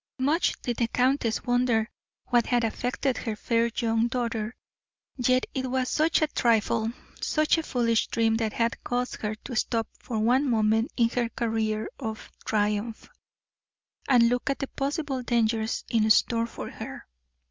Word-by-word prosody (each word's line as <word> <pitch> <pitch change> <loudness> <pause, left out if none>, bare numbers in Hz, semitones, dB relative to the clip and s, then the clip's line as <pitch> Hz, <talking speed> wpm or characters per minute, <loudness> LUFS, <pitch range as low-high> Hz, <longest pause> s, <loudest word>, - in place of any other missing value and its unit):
Much 290 +6 +1
did 240 -2 -2
the 235 - +1
countess 250 -2 +1
wonder 245 -3 +2 0.4
what 240 -1 +3
had 245 -1 +2
affected 245 +3 -1
her 225 -3 -3
fair 230 +2 +1
young 225 -1 +2
daughter. 235 -2 -2 0.6
Yet 255 0 +2
it 260 -1 -2
was 255 0 0
such 315 +1 +2
a - - +3
trifle, 230 -4 +1 0.3
such 310 +1 +2
a - - 0
foolish 235 -6 +1
dream 225 -1 +1
that 220 -2 -1
had 230 0 -1
caused 245 +1 -2
her 215 -1 -2
to 245 +3 -8
stop 225 0 0
for 235 - -4
one 250 +6 +3
moment 220 0 +2
in 230 -2 +4
her 240 -1 -1
career 220 -2 -1
of 220 -4 -6
triumph, 210 +1 -1 1.0
and 240 -3 +6
look 245 +3 0
at 275 - 0
the 275 - -3
possible 275 -1 -2
dangers 225 -2 0
in 220 -2 +2
store 230 +1 +3
for - - -7
her. - - -8
235 Hz, 160 wpm, -27 LUFS, 225-255 Hz, 1.0 s, and